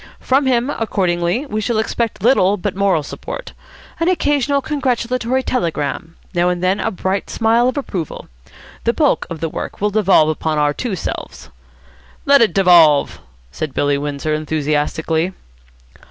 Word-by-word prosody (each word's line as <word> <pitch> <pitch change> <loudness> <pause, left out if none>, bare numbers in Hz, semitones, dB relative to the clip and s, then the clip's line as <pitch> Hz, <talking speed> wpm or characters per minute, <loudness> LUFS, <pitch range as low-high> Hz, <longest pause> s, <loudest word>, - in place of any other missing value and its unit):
From 270 +1 +1
him, 250 +1 +1
accordingly, 185 0 -1
we 215 -6 -3
shall 230 +1 -1
expect 220 -2 -2
little 205 -5 +4
but 190 0 -3
moral 195 -5 +1
support. - - -7 0.5
An 330 - +1
occasional 290 -6 +1
congratulatory 255 -3 -1
telegram. 165 - -2 0.2
Now 175 0 +2
and 180 0 -2
then 185 +2 +1
a - - 0
bright 190 -1 -3
smile 230 +2 +2
of 255 - -5
approval. 185 - -5 0.6
The 235 - +1
bulk 295 0 +1
of 165 -3 -7
the 165 - -1
work - - -6
will 210 +1 0
devolve 195 -7 +4
upon 155 0 -1
our 145 0 +2
two 225 - -3
selves." 165 - -6 0.7
"Let 280 -1 +6
it 225 - +4
devolve," 170 -7 +5 0.3
said 140 - -5
Billy 145 -1 +1
Windsor, 145 +1 -3
enthusiastically. 155 +3 -1
195 Hz, 150 wpm, -18 LUFS, 160-245 Hz, 0.7 s, Let